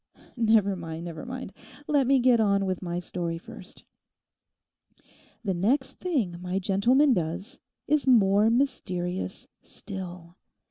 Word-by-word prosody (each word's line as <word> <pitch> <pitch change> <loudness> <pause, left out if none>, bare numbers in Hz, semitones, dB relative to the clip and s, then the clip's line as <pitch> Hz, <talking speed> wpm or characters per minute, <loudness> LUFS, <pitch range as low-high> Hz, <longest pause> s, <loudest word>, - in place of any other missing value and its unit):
'Never 220 -4 +3
mind, 165 -1 -6
never 165 +4 -7
mind; 255 -5 -6 0.3
let 280 -4 +2
me 275 +1 +5
get 245 -2 +4
on 200 -2 +2
with 185 -2 -2
my 175 -1 -3
story 170 -1 -4
first. 180 +3 -12 1.6
The 195 -4 0
next 260 +9 0
thing 250 - -1
my 180 +1 -2
gentleman 240 +9 +3
does 175 +1 -3 0.3
is 300 -2 +1
more 210 -3 +5
mysterious 190 -8 -2
still. 180 -3 -9
195 Hz, 125 wpm, -27 LUFS, 180-250 Hz, 1.6 s, me